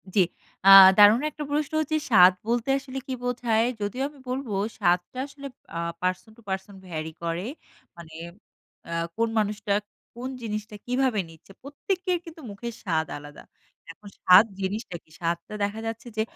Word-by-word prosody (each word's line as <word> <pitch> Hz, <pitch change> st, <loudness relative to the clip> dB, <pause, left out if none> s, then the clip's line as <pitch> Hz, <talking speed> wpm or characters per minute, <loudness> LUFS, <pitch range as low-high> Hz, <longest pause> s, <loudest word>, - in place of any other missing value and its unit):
জি। -, -, +4 dB, 0.5 s
আ -, -, +8 dB, 0.3 s
দারুণ 210 Hz, +4 st, +7 dB
একটা 300 Hz, 0 st, -7 dB
প্রশ্ন 295 Hz, 0 st, -1 dB
হচ্ছে 310 Hz, +1 st, -1 dB
স্বাদ 185 Hz, -5 st, +7 dB
বলতে 240 Hz, +2 st, 0 dB
আসলে 270 Hz, -1 st, -9 dB
কী 260 Hz, -, -3 dB
বোঝায়? 235 Hz, -2 st, +1 dB, 0.2 s
যদিও 235 Hz, +6 st, -2 dB
আমি 290 Hz, -1 st, -18 dB
বলব 260 Hz, +1 st, -3 dB, 0.3 s
স্বাদটা 180 Hz, +3 st, 0 dB
আসলে 280 Hz, 0 st, -9 dB, 0.3 s
আ -, -, -2 dB, 0.2 s
person 185 Hz, +3 st, -2 dB
to -, -, -17 dB
person 190 Hz, +1 st, -4 dB
vary 160 Hz, -2 st, -5 dB
করে। 170 Hz, +1 st, -2 dB, 0.5 s
মানে 165 Hz, -2 st, -12 dB, 0.8 s
আ -, -, -6 dB, 0.3 s
কোন 230 Hz, 0 st, +1 dB
মানুষটা, 210 Hz, -1 st, -1 dB, 0.4 s
কোন 250 Hz, +2 st, -5 dB
জিনিসটা 215 Hz, -1 st, -5 dB
কিভাবে 250 Hz, -3 st, +1 dB
নিচ্ছে। 165 Hz, +4 st, -17 dB
প্রত্যেকের 360 Hz, +6 st, -2 dB
কিন্তু 330 Hz, -1 st, -11 dB
মুখের 235 Hz, +4 st, -7 dB
স্বাদ 160 Hz, -4 st, 0 dB
আলাদা। 145 Hz, 0 st, -12 dB, 0.5 s
এখন 205 Hz, +5 st, -14 dB
স্বাদ 185 Hz, +4 st, +8 dB, 0.2 s
জিনিসটা 195 Hz, 0 st, -3 dB
কি? -, -, -32 dB
স্বাদটা 170 Hz, +3 st, -3 dB
দেখা 205 Hz, +2 st, -2 dB
যাচ্ছে 230 Hz, +2 st, -6 dB
যে, -, -, +2 dB
215 Hz, 160 wpm, -25 LUFS, 185-255 Hz, 0.8 s, আ